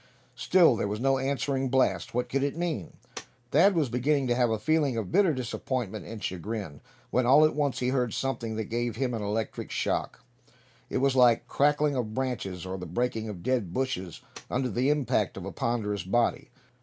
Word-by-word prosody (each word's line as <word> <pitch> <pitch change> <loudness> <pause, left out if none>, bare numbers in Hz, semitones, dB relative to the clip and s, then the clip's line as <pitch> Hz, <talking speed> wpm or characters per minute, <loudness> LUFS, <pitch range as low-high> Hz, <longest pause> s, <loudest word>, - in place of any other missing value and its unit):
Still 160 +5 +4
there 100 - -1
was 105 +1 -3
no 135 +1 +2
answering 135 0 -1
blast. 115 -8 +1
What 125 0 0
could 135 +2 -1
it 140 +3 -1
mean? 165 - -3 0.6
Thad 190 +6 +5
was 155 -4 +2
beginning 135 +4 +1
to 120 - +3
have 120 -1 +2
a 110 - 0
feeling 150 -1 +1
of 105 -5 -3
bitter 195 -4 +4
disappointment 125 -4 -3
and 110 -1 -8
chagrin, 95 -4 -5 0.3
when 125 -1 +2
all 145 +4 +7
at 155 - +2
once 145 -3 0
he 125 - 0
heard 125 -3 0
something 120 -4 -3
that 110 - -2
gave 120 +1 -2
him 125 0 -1
an 115 - -3
electric 105 +1 -3
shock. - - -2 0.7
It - - -1
was 135 0 +2
like 120 -3 +5
the - - -18
crackling 145 0 +2
of 110 -4 -3
branches, 115 -9 -3
or 95 +1 -5
the 90 - -6
breaking 110 +4 -2
of 95 -5 -8
dead 120 -9 0
bushes 125 -10 -3 0.3
under 130 -1 -1
the 125 +5 +1
impact 150 -3 0
of - - -6
a - - -5
ponderous 105 -4 -1
body. 115 +7 0
125 Hz, 195 wpm, -28 LUFS, 110-135 Hz, 0.7 s, all